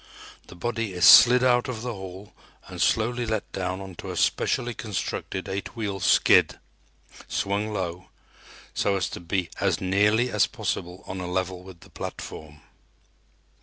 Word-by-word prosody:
The -, -, -12 dB
body 115 Hz, +1 st, -3 dB
is 90 Hz, -2 st, +4 dB
slid 125 Hz, +1 st, +9 dB
out 125 Hz, -1 st, +3 dB
of 115 Hz, -2 st, -5 dB
the 125 Hz, -1 st, -3 dB
hall 95 Hz, 0 st, -10 dB, 0.3 s
and -, -, -7 dB
slowly 120 Hz, +2 st, +1 dB
let 110 Hz, -2 st, -3 dB
down 95 Hz, 0 st, -3 dB
onto 95 Hz, -3 st, -9 dB
a -, -, -5 dB
specially 120 Hz, 0 st, 0 dB
constructed 95 Hz, -3 st, -4 dB
eight 100 Hz, +5 st, -5 dB
wheel 100 Hz, -4 st, -3 dB
skid, -, -, +4 dB, 0.7 s
swung 100 Hz, +2 st, -1 dB
low, 90 Hz, -3 st, -4 dB, 0.6 s
so 100 Hz, -, +1 dB
as 95 Hz, -, -1 dB
to -, -, -7 dB
be 85 Hz, +1 st, -2 dB
as 95 Hz, -5 st, +1 dB
nearly 105 Hz, +6 st, +2 dB
as 105 Hz, -2 st, +3 dB
possible 90 Hz, +2 st, -4 dB
on 95 Hz, -, -6 dB
a 90 Hz, -, -4 dB
level 90 Hz, 0 st, -2 dB
with 90 Hz, -2 st, -13 dB
the -, -, -17 dB
platform. 75 Hz, -1 st, -8 dB
95 Hz, 155 wpm, -25 LUFS, 90-110 Hz, 0.7 s, slid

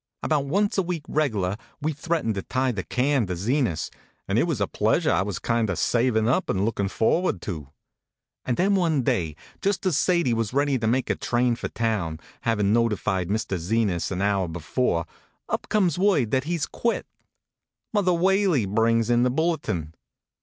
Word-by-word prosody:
About 150 Hz, -3 st, +1 dB
once 200 Hz, +6 st, +1 dB
a -, -, +5 dB
week 175 Hz, -4 st, -3 dB
reg 150 Hz, -6 st, 0 dB
lar 95 Hz, 0 st, -1 dB, 0.2 s
we 155 Hz, +1 st, -1 dB
threatened 150 Hz, -5 st, -1 dB
to 100 Hz, -, -3 dB
tie 130 Hz, +5 st, 0 dB
the 100 Hz, -5 st, -3 dB
can 130 Hz, -1 st, +1 dB
to 90 Hz, -, -2 dB
Zenas, 105 Hz, -, 0 dB, 0.4 s
and -, -, +1 dB
it -, -, +3 dB
was -, -, -1 dB
a -, -, +2 dB
pleasure -, -, +1 dB
I -, -, +2 dB
was 100 Hz, -3 st, -3 dB
kind 115 Hz, -2 st, 0 dB
of 95 Hz, -, -1 dB
savin 115 Hz, -2 st, +2 dB
up 135 Hz, +10 st, +1 dB
and 95 Hz, +1 st, +1 dB
lookin 100 Hz, -3 st, -1 dB
forward 115 Hz, -, +1 dB
to. -, -, -3 dB
HONK, 75 Hz, -3 st, -9 dB
HONK! 70 Hz, -, -32 dB, 0.7 s
And 125 Hz, -, -1 dB
then 195 Hz, +3 st, +3 dB
one 165 Hz, -8 st, +2 dB
day, 80 Hz, -9 st, 0 dB, 0.3 s
just 200 Hz, 0 st, 0 dB
as 180 Hz, -6 st, +2 dB
Sadie 170 Hz, -9 st, +2 dB
was 115 Hz, -1 st, -1 dB
ready 140 Hz, -2 st, +2 dB
to 110 Hz, -, -1 dB
make 125 Hz, +3 st, +1 dB
a -, -, 0 dB
train 120 Hz, 0 st, +1 dB
for 115 Hz, -, -4 dB
town, 105 Hz, -9 st, -1 dB, 0.2 s
havin 105 Hz, -3 st, +1 dB
noti 115 Hz, -2 st, +3 dB
fied 95 Hz, -3 st, -2 dB
Mr. 100 Hz, -3 st, -1 dB
Zenas 95 Hz, 0 st, 0 dB
an 95 Hz, 0 st, -2 dB
hour 100 Hz, -2 st, +1 dB
before, 85 Hz, -, -1 dB, 0.4 s
up -, -, -3 dB
comes 180 Hz, -6 st, +2 dB
word 180 Hz, -, +3 dB
that 130 Hz, 0 st, +1 dB
he 170 Hz, +2 st, -1 dB
s 160 Hz, -, -1 dB
quit. 235 Hz, -, -2 dB, 0.9 s
Mother 200 Hz, -4 st, +2 dB
Whaley 180 Hz, -, +2 dB
brings 115 Hz, +3 st, +2 dB
in 120 Hz, 0 st, +4 dB
the 125 Hz, -, +3 dB
bulletin. 135 Hz, -, -1 dB
120 Hz, 195 wpm, -25 LUFS, 100-155 Hz, 0.9 s, a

